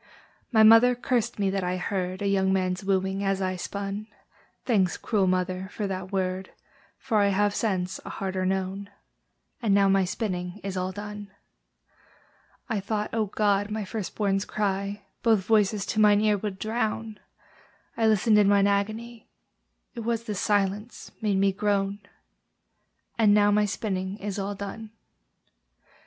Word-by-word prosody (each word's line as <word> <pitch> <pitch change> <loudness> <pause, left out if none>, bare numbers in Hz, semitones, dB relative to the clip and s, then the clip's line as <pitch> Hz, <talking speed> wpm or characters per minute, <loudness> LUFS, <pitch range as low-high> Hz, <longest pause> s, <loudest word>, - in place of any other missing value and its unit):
My 220 -3 +5
mother 225 +3 +7
cursed 240 -1 -1
me 200 -2 +1
that 195 -1 -1
I 180 +1 -1
heard 185 +1 -3
A - - +1
young 190 -1 +2
man's 185 0 0
wooing 190 0 0
as 195 -1 0
I 185 -1 -1
spun: 200 +3 -5 0.6
Thanks, 195 -7 +2
cruel 205 -5 0
mother, 185 +1 -1
for 210 - -3
that 190 -1 -4
word, 185 -1 -2 0.5
For 230 -5 0
I 200 - +4
have, 200 +1 +2
since, 190 -4 -1
a - - -8
harder 190 -1 -3
known! 190 +1 -2 0.7
And 210 -4 +2
now 200 -1 +4
my 195 -1 +3
spinning 180 -1 -3
is 195 -1 -4
all 185 0 -2
done. 205 +1 -7 1.4
I 220 - -1
thought, 210 +2 -3
O 220 -2 0
God! 205 0 +1
my 215 -1 -3
first 210 -1 -5
born's 195 -2 +1
cry 200 -1 -2 0.2
Both 220 -5 +3
voices 210 -2 +2
to 215 - -2
mine 210 -1 +5
ear 215 -1 +3
would 200 -1 -4
drown: 220 0 -2 0.8
I 225 -1 +2
listened 215 0 +4
in 205 - +4
mine 200 -1 +4
agony, 215 +4 -2 0.6
It 240 - -7
was 230 0 -1
the 215 - -4
silence 205 +2 -1
made 210 -3 +1
me 195 0 +3
groan! 200 0 0 1.2
And 210 -2 +5
now 205 0 +4
my 210 0 +3
spinning 190 -2 -3
is 205 -1 -4
all 200 +1 -3
done. 210 +2 -7
200 Hz, 155 wpm, -26 LUFS, 190-215 Hz, 1.4 s, mother